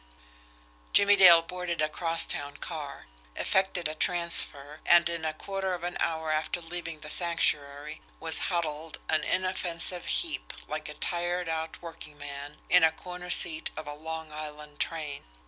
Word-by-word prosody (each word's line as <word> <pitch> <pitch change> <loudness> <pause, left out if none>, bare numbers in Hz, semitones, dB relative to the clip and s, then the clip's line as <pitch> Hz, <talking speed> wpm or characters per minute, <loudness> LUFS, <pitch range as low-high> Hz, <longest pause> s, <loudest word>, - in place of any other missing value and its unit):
Jimmie 205 0 +7
Dale 175 -4 +9
boarded 180 -1 -4
a 155 - +3
cross 165 +1 0
town 145 0 -4
car, 145 -5 -6 0.3
effected 190 -3 +1
a 155 - -4
transfer, 155 -3 +2
and 175 0 +6
in 170 -1 -3
a 155 - 0
quarter 190 +1 -3
of 175 - -9
an 175 0 -3
hour 160 -1 -1
after 155 +3 -1
leaving 165 -2 -6
the - - -8
Sanctuary 150 -3 0 0.2
was 160 -1 +1
huddled, 160 -3 -2
an 155 -1 +2
inoffensive 180 -1 -1
heap, - - -1
like - - -4
a - - -7
tired 175 0 -2
out 160 +1 -3
workingman, 145 -3 -8
in 180 -1 +6
a 160 - +6
corner 180 +2 -9
seat 160 -2 +4
of 155 -1 -6
a 145 - -4
Long 160 +1 -6
Island 150 -1 -8
train. 155 -4 -3
165 Hz, 155 wpm, -29 LUFS, 150-175 Hz, 0.3 s, Dale